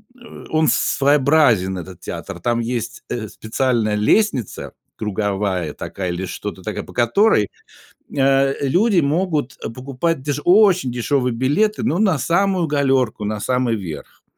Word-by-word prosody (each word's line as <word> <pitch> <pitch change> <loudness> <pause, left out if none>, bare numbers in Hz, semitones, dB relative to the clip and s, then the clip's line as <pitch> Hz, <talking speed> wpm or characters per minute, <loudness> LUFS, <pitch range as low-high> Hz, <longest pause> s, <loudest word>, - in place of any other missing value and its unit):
э, 240 -2 -13
он 155 0 +2
своеобразен, 135 -9 +3
этот 90 0 -10
театр, - - -7
там 120 +6 0
есть, 120 0 -4
э, 110 -3 -3
специальная 110 -1 -1
лестница, 125 - 0 0.2
круговая 100 -5 -2
такая 90 -2 -5
или 90 +2 -3
что-то 95 +2 -6
такая, 105 +3 -4
по - - -13
которой, 120 - +3 0.7
э, 135 0 +3
люди 185 - +3
могут 150 -3 -1 0.2
покупать 135 +4 -2
деш 145 +1 -2
очень 185 -6 +5
дешевые 125 +1 0
билеты, 185 - +1
но 180 -5 0
на 195 -7 +3
самую 180 +4 +1
галёрку, 135 -7 +1
на 105 0 -2
самый 125 -1 0
верх. 85 -8 -8
130 Hz, 135 wpm, -20 LUFS, 110-155 Hz, 0.7 s, очень